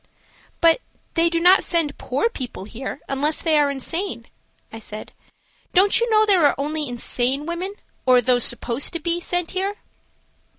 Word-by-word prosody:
"But 335 +8 +4 0.3
they 335 0 +2
do 335 0 0
not 360 +3 +6
send 325 -4 0
poor 270 - 0
people 255 - -7
here 255 +7 -7
unless 290 +3 0
they 315 -2 +3
are 290 -1 +3
insane," 280 - -3 0.5
I 225 - -7
said. 215 -1 -8 0.6
"Don't 395 +4 +4
you 470 0 0
know 435 -1 +4
there 385 -5 +3
are - - +1
only 300 0 -2
insane 250 +3 0
women, 355 +4 -4 0.3
or 250 -1 +6
those 245 0 +2
supposed 240 +3 +1
to 335 - -3
be 340 +2 -1
so, 350 - -11
sent 355 -1 -1
here?" 390 +2 -2
315 Hz, 170 wpm, -22 LUFS, 255-355 Hz, 0.6 s, not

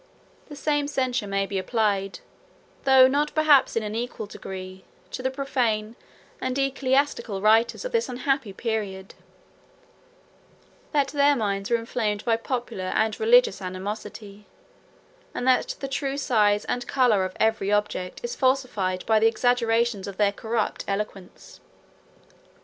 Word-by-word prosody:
The 295 - -8
same 290 0 0
censure 255 -6 -1
may 195 0 0
be 195 -1 -3
applied, 200 -2 -1 0.6
though 265 -1 +7
not 290 +3 0
perhaps 310 -3 +4
in 230 - 0
an 210 0 -4
equal 230 -1 -4
degree, 185 -2 -9 0.3
to - - -5
the 260 - 0
profane, 240 -5 -1 0.5
and 255 - -2
the 275 0 +2
ecclesiastical, 270 -5 0
writers 220 - +3
of - - -4
this 465 - 0
unhappy 255 -2 -1
period; 195 -3 -4 1.8
that 285 -3 +1
their 285 0 +3
minds 200 -4 -2
were 235 - +3
inflamed 225 -3 -2
by 230 -2 +3
popular 230 -5 -4
and 220 0 +1
religious 465 - +4
animosity; 200 +2 -7 0.9
and - - -3
that 255 - +2
the 275 - -3
true 275 0 -2
size 210 -6 +2
and 245 0 -3
color 245 -8 +3
of 185 0 -5
every 220 -2 +1
object 205 -3 -1
is 480 0 -4
falsified 250 -9 0
by 220 -1 +3
the 225 - +5
exaggerations 230 -3 +1
of 195 -1 -7
their 205 -1 +3
corrupt 220 +1 -2
eloquence. 195 -2 -6
225 Hz, 140 wpm, -25 LUFS, 205-265 Hz, 1.8 s, though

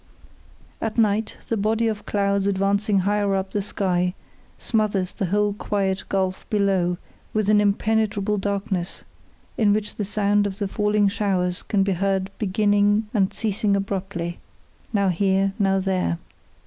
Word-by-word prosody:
At 225 0 -3
night 215 -1 +1
the 230 - 0
body 220 +3 +1
of 215 -2 -3
clouds 200 -1 +1
advancing 200 +1 +2
higher 200 0 +1
up 190 0 -2
the 205 - 0
sky 180 -2 -1 0.4
smothers 210 -5 0
the 195 - -2
whole 205 +2 +1
quiet 195 -2 -1
gulf 190 -1 -1
below 195 -5 +1 0.4
with 215 -1 +1
an 210 -1 +5
impenetrable 210 0 +1
darkness, 195 -2 -2 0.6
in 205 -3 +4
which 210 0 -2
the 210 - -1
sound 205 0 +1
of 195 -1 -6
the 205 -2 -1
falling 210 +1 +2
showers 185 -3 0
can 200 -2 +1
be 195 0 +1
heard 195 +1 0
beginning 205 +1 +2
and 195 -4 +2
ceasing 205 -1 0
abruptly 190 -3 -3 0.5
now 200 -3 +2
here, 195 +2 +2
now 195 -1 +3
there. 185 - 0
200 Hz, 145 wpm, -23 LUFS, 190-210 Hz, 0.6 s, an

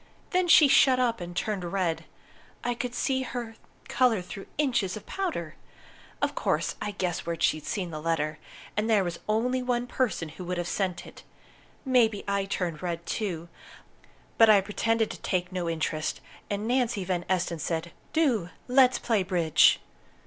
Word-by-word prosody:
Then 365 -1 +2
she 315 -3 +8
shut 265 -1 +5
up 230 -5 +1
and 175 0 -7
turned 210 -4 -1
red. 175 -2 -1 0.6
I 245 - 0
could 245 0 -4
see 260 +2 0
her 240 -3 -5 0.3
colour 245 -4 +3
through 195 +2 -9
inches 235 -10 +1
of 215 - -11
powder! 320 - -3 0.7
Of - - +1
course, - - 0
I - - -2
guessed 185 -3 -3
where 170 -1 -2
she'd 155 -2 +1
seen 185 -5 -2
the 155 -1 -5
letter. 155 -2 -1 0.4
And 215 +2 0
there 210 -3 +4
was 175 -2 -4
only 250 +4 +1
one 245 -1 0
person 245 -10 -1
who 175 +3 -9
could 180 0 -2
have 175 0 -2
sent 185 -1 -2
it. - - -12 0.6
Maybe 230 -6 +3
I 200 0 0
turned 175 -5 -3
red, 170 -1 -3
too. 175 -7 -3 0.9
But 225 -1 +8
I 210 -2 +8
pretended 225 +3 0
to - - -9
take 180 -1 -1
no 180 -2 -2
interest, 155 -1 -2 0.3
and 205 +2 -2
Nancy 240 -4 +1
Van 180 -1 -1
Esten 175 -3 0
said 165 +2 -3 0.2
'Do 250 - +1 0.2
let's 255 0 +5
play 225 -5 +1
bridge!' 175 -4 +4
200 Hz, 170 wpm, -27 LUFS, 175-240 Hz, 0.9 s, she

